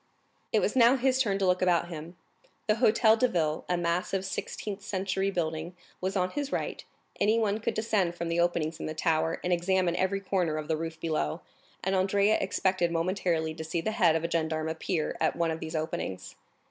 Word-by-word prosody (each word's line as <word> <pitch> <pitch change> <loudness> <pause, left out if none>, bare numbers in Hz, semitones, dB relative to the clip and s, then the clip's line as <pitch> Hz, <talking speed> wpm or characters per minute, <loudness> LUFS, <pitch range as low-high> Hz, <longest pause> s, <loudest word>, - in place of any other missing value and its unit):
It - - +3
was - - 0
now 245 0 +6
his 260 0 +2
turn 200 -6 +1
to 195 - 0
look 180 0 +2
about 175 -2 +2
him; 165 +1 -8 0.5
the 215 - +3
Hôtel 220 0 +4
de 255 - +4
Ville, 160 -7 -1
a 180 - +2
massive 175 +3 -1
sixteenth 200 +1 -4
century 195 -1 -1
building, 165 -1 -3 0.3
was 190 +2 -2
on 185 -1 +1
his 285 -1 -3
right; - - -3 0.4
anyone 215 0 +2
could 225 - -2
descend 210 -6 +1
from 170 0 -3
the 165 +1 0
openings 170 -2 0
in - - -4
the 155 - -4
tower, 160 0 +1
and 180 - +1
examine 175 0 +1
every 190 +2 0
corner 185 -5 0
of 155 -1 -4
the 160 - +1
roof 160 0 -5
below, 155 - -1 0.4
and 190 - 0
Andrea 200 +3 +3
expected 185 -3 +1
momentarily 165 -2 0
to 160 0 -6
see 160 +2 -2
the 215 +6 -1
head 170 -6 +3
of 165 - 0
a - - +1
gendarme 160 -1 0
appear 160 0 -2
at 160 - +2
one 170 -1 +1
of 160 - -4
these 160 0 -6
openings. 155 - -4
175 Hz, 200 wpm, -29 LUFS, 160-195 Hz, 0.5 s, now